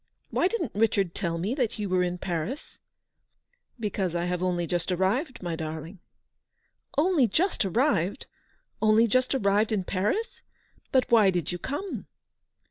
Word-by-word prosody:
Why 355 - +3
didn't 370 - -2
Richard 200 -4 +1
tell 170 -4 -2
me 190 +8 -1
that 245 -5 -1
you 210 -1 -2
were 185 -1 +2
in 180 0 -1
Paris 180 - -4 0.3
?" - - -51
" - - -43
Because 195 -5 -2
I 170 0 0
have 180 0 -2
only 180 -2 0
just 175 +1 -2
arrived, 205 - 0
my 170 -2 -2
darling." 160 +3 -6 0.5
" - - -30
Only 305 -4 +4
just 335 - +1
arrived! 195 - +1 0.6
Only 215 +1 +5
just 255 +4 +2
arrived 205 -2 +2
in 205 -4 +1
Paris! 205 - -1 0.5
But 260 -1 +4
why 220 -4 +6
did 175 -4 -1
you 175 - -4
come 295 - -4
200 Hz, 160 wpm, -27 LUFS, 180-255 Hz, 0.6 s, why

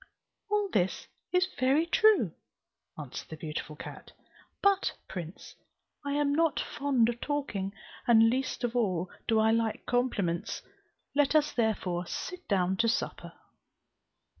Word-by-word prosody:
"All 415 0 +2
this 185 -1 0 0.3
is 365 0 +3
very 270 +6 +3
true," 355 - +4 0.6
answered - - -7
the 160 - -7
beautiful 150 -1 -5
cat, - - -10 0.5
"but, 400 -1 +3
prince, 175 -1 -7 0.5
I 285 0 -2
am 290 0 +2
not 325 +1 +2
fond 270 -5 +1
of 240 0 -3
talking, 275 -10 -2 0.4
and 225 -1 +7
least 255 +1 -1
of 240 0 -1
all 185 -7 0 0.2
do 225 -1 +3
I 220 0 +4
like 225 -1 0
compliments; 215 -9 0 0.5
let 290 +1 +3
us 300 -1 +4
therefore 185 -7 0
sit 360 -1 -6
down 190 -2 +1
to 230 +2 +3
supper." 235 - -2
235 Hz, 135 wpm, -30 LUFS, 190-290 Hz, 0.6 s, and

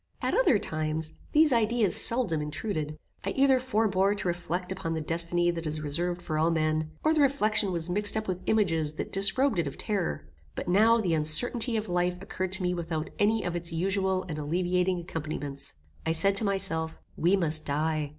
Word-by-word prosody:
At - - -1
other - - +4
times, 155 -2 -2 0.2
these 300 -2 +5
ideas 230 -2 +2
seldom 230 -11 +3
intruded. 150 0 -4 0.3
I 195 - -2
either 270 -1 +4
forbore 210 -5 +1
to 205 - -4
reflect 175 +1 -3
upon 190 -4 -3
the 160 - -2
destiny 170 +2 +1
that 165 -1 -5
is 155 0 -2
reserved 175 +4 -2
for 155 -2 -2
all 160 +1 +3
men, 155 -1 0
or 310 - +3
the 310 - +2
reflection 215 -7 +2
was 170 -2 -2
mixed 205 +4 0
up 220 - -3
with 185 -1 -3
images 165 -8 +1
that - - -5
disrobed 210 +4 +2
it 165 - 0
of 140 - -7
terror; 195 - -2 0.3
but - - -5
now 220 +6 +5
the 180 -6 0
uncertainty 225 +10 +2
of 215 0 -3
life 180 0 0
occurred 185 -1 -4
to 190 0 +2
me 180 0 +1
without 165 -2 -4
any 215 +1 +2
of 175 -1 -3
its 170 0 -2
usual 190 +2 0
and 155 -3 -5
alleviating 180 +4 0
accompaniments. 155 -4 -5 0.3
I 160 - 0
said 195 +4 +3
to 220 - +2
myself, 165 -5 -1 0.2
we 175 +4 +3
must 160 -4 -1
die. 155 +1 -1
180 Hz, 190 wpm, -28 LUFS, 160-205 Hz, 0.3 s, these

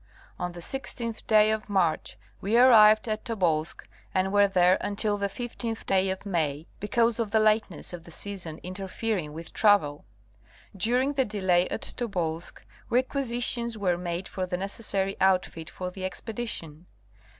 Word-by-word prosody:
On 180 0 -3
the 175 - -9
16th 230 +1 -6
day 215 -1 +5
of 220 -1 -3
March 185 -6 0 0.2
we 210 +4 +1
arrived 220 -3 +7
at 215 -1 -2
Tobolsk 170 -8 -1 0.3
and 190 +1 +1
were 205 0 +5
there 185 -1 +4
until 205 +1 0
the 200 -1 -1
15th 230 +1 -5
day 190 0 +2
of 190 +2 -4
May 160 -5 -1
because 230 +3 +1
of 225 -3 -1
the 220 - +3
lateness 215 -6 +1
of 175 -2 -7
the 170 - -14
season 175 -2 -4
interfering 190 -2 -3
with 165 +2 -8
travel. 195 -9 +3 0.7
During 250 +8 +2
the 270 -2 +1
delay 185 -4 +1
at - - -4
Tobolsk 175 -8 -3 0.2
requisitions 240 -2 0
were 185 -4 +1
made 175 +1 -4
for 185 -1 -4
the 180 - -2
necessary 195 0 -2
outfit 185 -3 +1
for 180 -1 -6
the 185 +1 -8
expedition. 185 -6 -4
195 Hz, 150 wpm, -27 LUFS, 180-225 Hz, 0.7 s, arrived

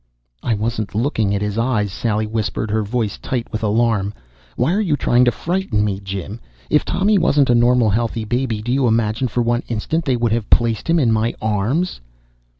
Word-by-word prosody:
"I 115 - 0
wasn't 110 -1 -3
looking 110 -4 0
at 100 - -1
his 105 +1 -2
eyes!" 110 -5 0
Sally 110 +1 -1
whispered, 110 -1 -2
her 110 +1 +1
voice 110 0 -2
tight 125 -3 -3
with 110 - -3
alarm. 105 -2 +1 0.4
"Why 165 - +1
are 210 - +1
you 165 -8 +1
trying 125 -1 +3
to 120 - +4
frighten 165 - -1
me, 100 -2 -2
Jim? 100 +2 -6 0.3
If 150 - +4
Tommy 195 +3 +2
wasn't 140 -6 +3
a - - +5
normal, 120 -2 +4
healthy 115 +1 -1
baby 120 -2 -1
do 120 - -2
you 130 -1 +2
imagine 110 +2 +1
for 120 +1 -1
one 120 +1 +1
instant 135 +9 -2
they 130 - +2
would 120 -2 0
have 115 -2 -1
placed 115 +3 +2
him 170 - +4
in 125 -8 +3
my 110 +1 0
arms?" 110 - -1
115 Hz, 200 wpm, -19 LUFS, 105-125 Hz, 0.4 s, a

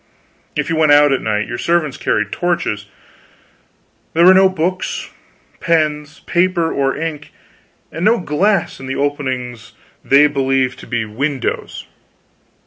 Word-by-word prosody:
If - - -1
you 165 - -1
went 155 -2 +4
out 145 0 +5
at 135 - -1
night, 105 -1 -1
your 120 - -5
servants 170 -4 0
carried 105 -1 -1
torches. 170 -13 -2 1.3
There 170 +1 +5
were 185 - +9
no 190 0 +5
books, 185 +1 -3 0.5
pens, 150 -3 -1
paper 175 -2 +1
or 135 -1 0
ink, 150 -2 -5 0.6
and 165 - -5
no 220 +4 +4
glass 185 +3 0
in 135 - -8
the 135 - -3
openings 130 -5 -3 0.3
they 140 +2 +5
believed 135 -3 0
to - - -12
be 120 -3 -2
windows. 130 +5 -3
150 Hz, 135 wpm, -17 LUFS, 130-170 Hz, 1.3 s, were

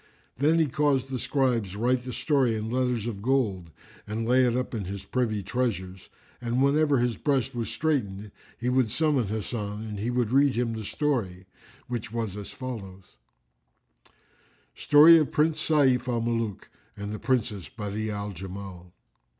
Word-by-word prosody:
Then 150 +5 +3
he 165 - +4
caused 135 -2 0
the 130 - -2
scribes 120 -10 0
write 125 +3 +1
the 125 - -4
story 130 -3 +1
in 110 +1 -4
letters 125 -3 0
of 110 -4 -4
gold 105 -9 0 0.4
and 110 +2 -3
lay 130 +2 +4
it 120 0 +1
up 125 - -3
in 105 -4 -3
his 100 +1 -6
privy 110 -5 -1
treasures: 95 -4 -3 0.3
and 120 +1 -1
whenever 145 0 +3
his 120 -1 0
breast 135 -3 0
was 120 -2 -3
straitened, 105 -10 -2 0.3
he 120 - -4
would 125 -2 +2
summon 145 -3 +1
Hasan 105 0 -4
and 105 -2 -6
he 110 +4 -2
would 120 -2 0
read 140 +1 +4
him 120 -1 0
the 110 -1 -5
story,[FN#353] 105 -11 -2 0.4
which 120 -2 -4
was 115 -4 -3
as 105 -1 -7
follows:— 100 -7 -8 1.6
Story 155 +3 +7
of 150 -5 0
Prince 155 +1 +1
Sayf 130 -5 +3
al 120 -2 0
Muluk 115 -3 -2 0.3
and 100 +1 -5
the 105 - -5
Princess 110 -6 -1
Badi'a 110 0 -4
al 105 0 -4
Jamal. 95 -1 -9
120 Hz, 165 wpm, -27 LUFS, 105-130 Hz, 1.6 s, Story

